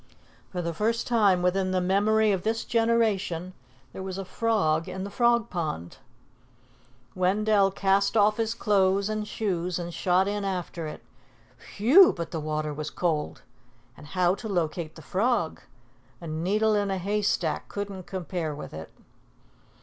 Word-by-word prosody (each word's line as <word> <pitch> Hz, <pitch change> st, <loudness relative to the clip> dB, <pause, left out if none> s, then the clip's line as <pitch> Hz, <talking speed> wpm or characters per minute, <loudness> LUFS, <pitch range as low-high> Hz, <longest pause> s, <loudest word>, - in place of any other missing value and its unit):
For 180 Hz, -2 st, -4 dB
the 170 Hz, 0 st, -2 dB
first 225 Hz, +6 st, 0 dB
time 205 Hz, -7 st, +3 dB
within 185 Hz, +1 st, +1 dB
the 185 Hz, 0 st, +1 dB
memory 210 Hz, +4 st, +3 dB
of 190 Hz, -3 st, 0 dB
this 225 Hz, +3 st, -1 dB
generation, 215 Hz, -7 st, +1 dB, 0.4 s
there -, -, -7 dB
was 190 Hz, 0 st, -5 dB
a 195 Hz, -, -5 dB
frog 180 Hz, -8 st, 0 dB
in 190 Hz, -, -5 dB
the 200 Hz, -, -6 dB
Frog 235 Hz, -1 st, +2 dB
Pond. 155 Hz, -, -4 dB, 1.2 s
Wendell 200 Hz, +2 st, +2 dB
cast 195 Hz, +2 st, +1 dB
off 210 Hz, 0 st, +4 dB
his 225 Hz, 0 st, -1 dB
clothes 200 Hz, -2 st, +2 dB
and 215 Hz, -1 st, -3 dB
shoes 180 Hz, -6 st, -2 dB
and 175 Hz, -1 st, -5 dB
shot 185 Hz, +2 st, +2 dB
in 205 Hz, 0 st, -2 dB
after 180 Hz, -4 st, -3 dB
it. 150 Hz, -, -8 dB, 0.7 s
Whew! 285 Hz, -, +7 dB
but 170 Hz, -2 st, -6 dB
the 165 Hz, -, -3 dB
water 155 Hz, 0 st, -2 dB
was 150 Hz, +1 st, -5 dB
cold! 160 Hz, -4 st, -2 dB, 0.5 s
And 150 Hz, -, -13 dB
how 180 Hz, +1 st, +2 dB
to 215 Hz, +3 st, -6 dB
locate 165 Hz, -3 st, -2 dB
the 160 Hz, -, -12 dB
frog? 195 Hz, -, 0 dB, 0.6 s
A -, -, -10 dB
needle 190 Hz, +8 st, +1 dB
in 205 Hz, -1 st, +1 dB
a 190 Hz, -, -1 dB
hay 205 Hz, +3 st, -1 dB
stack 165 Hz, -6 st, -1 dB
couldn't 200 Hz, -3 st, -6 dB
compare 175 Hz, -4 st, -4 dB
with 150 Hz, -, -9 dB
it. 80 Hz, +1 st, -8 dB
190 Hz, 155 wpm, -27 LUFS, 170-210 Hz, 1.2 s, Whew